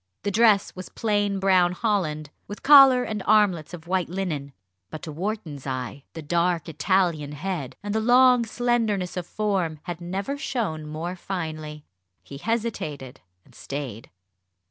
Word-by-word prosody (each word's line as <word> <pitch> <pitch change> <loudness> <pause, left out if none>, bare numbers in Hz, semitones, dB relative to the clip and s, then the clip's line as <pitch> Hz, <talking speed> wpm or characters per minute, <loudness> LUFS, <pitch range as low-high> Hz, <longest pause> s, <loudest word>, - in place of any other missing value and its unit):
The 205 - -1
dress 210 -1 +3
was 185 -1 -8
plain 205 -2 0
brown 185 -2 +3
holland, 170 -9 -1 0.2
with 205 - -9
collar 270 -3 +8
and 215 -4 -4
armlets 205 -7 +3
of 175 -2 -9
white 180 -1 -1
linen; 165 -7 -3 0.4
but, 155 - -8
to 160 - -6
Wharton's 165 -5 -5
eye, 130 +1 -5
the 160 - -7
dark 170 +1 0
Italian 160 -1 0
head, 155 -4 -4
and 205 0 -3
the 220 - +1
long 250 +1 +5
slenderness 225 -5 -1
of 180 -2 -4
form 190 -7 -1
had 175 -1 -6
never 195 +11 -4
shown 200 - -3
more 165 +4 -4
finely. 155 -5 -6 0.4
He 140 - -10
hesitated 155 - -3 0.2
and - - -22
stayed. 135 -6 -7
180 Hz, 145 wpm, -25 LUFS, 155-210 Hz, 0.4 s, collar